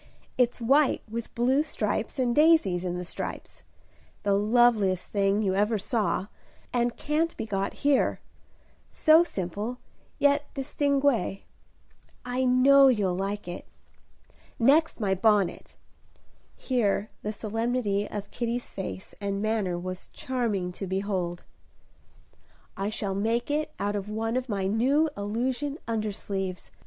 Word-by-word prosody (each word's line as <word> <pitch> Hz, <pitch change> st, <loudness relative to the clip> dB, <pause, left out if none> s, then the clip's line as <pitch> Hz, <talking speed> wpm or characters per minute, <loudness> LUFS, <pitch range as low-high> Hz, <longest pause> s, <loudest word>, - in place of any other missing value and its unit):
It's 245 Hz, -1 st, +2 dB
white 270 Hz, +5 st, +3 dB
with 230 Hz, +1 st, -6 dB
blue 255 Hz, +4 st, +3 dB
stripes 305 Hz, -1 st, -2 dB
and 245 Hz, -2 st, +1 dB
daisies 300 Hz, -, +4 dB
in 180 Hz, -1 st, -2 dB
the 180 Hz, -, -5 dB
stripes; -, -, -6 dB, 0.6 s
the 200 Hz, -1 st, +2 dB
loveliest 210 Hz, -3 st, +3 dB
thing 200 Hz, +1 st, +2 dB
you 190 Hz, -2 st, +1 dB
ever 210 Hz, +3 st, +2 dB
saw, 210 Hz, -2 st, -1 dB, 0.5 s
and 240 Hz, -1 st, 0 dB
can't 315 Hz, +3 st, -1 dB
be -, -, -3 dB
got 195 Hz, -2 st, -2 dB
here. 285 Hz, -2 st, +3 dB, 0.7 s
So 315 Hz, +1 st, +5 dB
simple, 205 Hz, -, -4 dB, 0.4 s
yet 285 Hz, 0 st, +2 dB
distingué, 275 Hz, -7 st, 0 dB, 0.8 s
I 250 Hz, +1 st, -1 dB
know 270 Hz, +2 st, +6 dB
you'll 205 Hz, -8 st, +2 dB
like 195 Hz, +1 st, -3 dB
it. 175 Hz, -, -7 dB, 0.9 s
Next, 290 Hz, +7 st, +3 dB
my 200 Hz, -3 st, +1 dB
bonnet," 205 Hz, -1 st, +1 dB, 0.8 s
here 215 Hz, -5 st, 0 dB
the 210 Hz, -, -3 dB
solemnity 220 Hz, -1 st, -1 dB
of 205 Hz, -1 st, -6 dB
Kitty's 240 Hz, 0 st, -3 dB
face 190 Hz, 0 st, -6 dB
and 200 Hz, -1 st, -2 dB
manner 210 Hz, -4 st, 0 dB
was 185 Hz, +1 st, -6 dB
charming 220 Hz, -8 st, -2 dB
to 195 Hz, +2 st, -6 dB
behold. 190 Hz, -2 st, -2 dB, 1.3 s
"I 195 Hz, +1 st, -2 dB
shall 205 Hz, -2 st, -3 dB
make 230 Hz, +6 st, 0 dB
it 300 Hz, +1 st, -1 dB
out 205 Hz, +1 st, -1 dB
of 205 Hz, 0 st, -4 dB
one 225 Hz, +2 st, -2 dB
of 255 Hz, 0 st, -2 dB
my 200 Hz, -3 st, -1 dB
new 265 Hz, +10 st, +2 dB
illusion 250 Hz, +7 st, -2 dB
undersleeves. 200 Hz, -4 st, -3 dB
220 Hz, 125 wpm, -27 LUFS, 195-255 Hz, 1.3 s, know